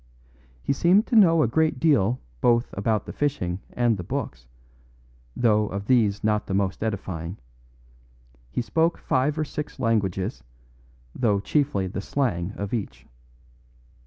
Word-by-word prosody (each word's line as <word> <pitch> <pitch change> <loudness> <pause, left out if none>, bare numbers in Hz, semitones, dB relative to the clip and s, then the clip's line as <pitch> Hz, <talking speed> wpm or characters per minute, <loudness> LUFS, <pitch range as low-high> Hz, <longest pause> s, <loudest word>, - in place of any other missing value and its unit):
He - - +1
seemed 180 - +4
to - - -2
know 165 -7 +6
a - - +2
great 160 +7 +1
deal 130 -7 +3 0.2
both 120 0 +2
about 105 +2 0
the - - -7
fishing 95 -12 -1
and 120 -3 +1
the 90 - -5
books, 85 - -5 0.9
though 105 -3 +3
of 100 +1 -5
these 105 -4 +2
not 105 0 +1
the 95 - -1
most 95 -1 -1
edifying; 95 -4 -4 1.1
he 120 - -2
spoke 165 +7 +1
five 140 +4 0
or 155 - 0
six 150 0 -6
languages, 100 - -1 0.7
though 105 -5 +1
chiefly 120 -2 0
the 95 +1 -4
slang 100 -8 -1
of 100 +1 -5
each. 70 - -4
110 Hz, 140 wpm, -25 LUFS, 100-140 Hz, 1.1 s, know